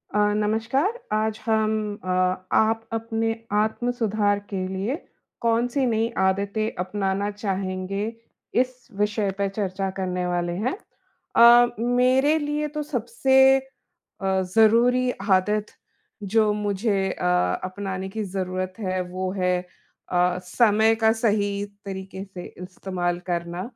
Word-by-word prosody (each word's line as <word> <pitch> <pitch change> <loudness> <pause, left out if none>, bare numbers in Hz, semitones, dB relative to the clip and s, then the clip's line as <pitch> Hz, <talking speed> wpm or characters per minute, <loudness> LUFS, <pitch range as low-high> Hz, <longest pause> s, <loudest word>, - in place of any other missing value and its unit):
अ, - - +3 0.2
नमस्कार, 225 - +1 0.2
आज 215 0 0
हम 220 -1 +2 0.3
अ, 185 - -5 0.5
आप 225 +1 +1
अपने 225 0 -1 0.2
आत्म-सुधार 215 -1 +1
के 190 -2 -2
लिए, 190 +7 -2 0.5
कौन-सी 240 +4 +1
नई 225 -2 +1
आदतें 200 +3 +1
अपनाना 195 +1 -1
चाहेंगे? 195 -1 -3 0.6
इस 255 0 -5
विषय 210 -1 +1
पे 200 0 +1
चर्चा 195 -1 -1
करने 180 -1 -1
वाले 175 -1 -1
हैं। 255 - 0 0.6
अ, 240 +1 +8 0.3
मेरे 265 +5 +4
लिए 295 0 -1
तो 300 - -1
सबसे 265 0 +4 0.6
अ, 190 -1 +1
ज़रूरी 240 +3 +4 0.2
आदत 210 +3 +3 0.7
जो 220 -1 +4
मुझे 205 +1 0 0.2
अ, - - -4 0.4
अपनाने 190 0 -5
की 215 +2 -4
ज़रूरत 185 -1 -3
है 185 -3 -1
वो 185 0 -2
है 180 -1 +2 0.5
अ, 180 0 +2
समय 220 +3 +3
का 220 - +6
सही 205 -3 +2 0.3
तरीके 190 0 -6
से 185 -2 -9 0.2
इस्तेमाल 180 -1 -3
करना। 170 0 -2
210 Hz, 120 wpm, -24 LUFS, 190-230 Hz, 0.7 s, अ